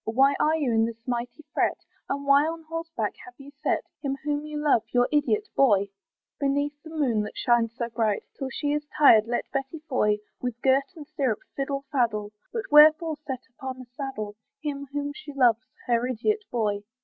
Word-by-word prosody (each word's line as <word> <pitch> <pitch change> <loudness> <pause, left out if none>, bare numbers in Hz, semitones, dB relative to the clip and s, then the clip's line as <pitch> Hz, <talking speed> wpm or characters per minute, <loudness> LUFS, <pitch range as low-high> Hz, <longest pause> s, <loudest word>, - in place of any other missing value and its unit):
Why 270 +3 +5
are 310 +1 +3
you 290 -6 0
in 225 0 +4
this 230 0 -7
mighty 245 +4 -3
fret? - - +1 0.3
And 280 0 -2
why 280 +1 +5
on 325 0 -5
horseback 325 -8 -3
have 250 - -13
you 280 0 -12
set - - +1 0.2
Him 275 -2 -2
whom 295 0 -2
you 305 0 -5
love, 295 -6 +3
your 245 0 +3
idiot 360 +9 +1
boy? 200 -7 +4 0.5
Beneath 285 +1 +1
the 320 - -11
moon 275 -9 +1
that 210 - -6
shines 235 -2 +2
so 235 -1 -2
bright, 225 -3 0
Till 270 -2 -4
she 290 +2 -1
is 295 0 -2
tired, 225 -7 +7
let 240 0 -2
Betty 270 +3 -3
Foy 210 -6 +2 0.2
With 245 -2 -3
girt 270 +1 +4
and 305 -3 -9
stirrup 260 -7 -1
fiddle 275 0 -2
faddle; 215 -6 0 0.2
But 455 -2 -3
wherefore 310 +2 +7
set 260 -3 -4
upon 260 -2 -6
a 255 - -9
saddle 235 -7 -5 0.2
Him 280 -2 -4
whom 290 0 -3
she 290 0 -10
loves, 250 -2 +3 0.2
her 240 0 +1
idiot 420 - -1
boy? 210 -4 0
275 Hz, 190 wpm, -26 LUFS, 235-295 Hz, 0.5 s, tired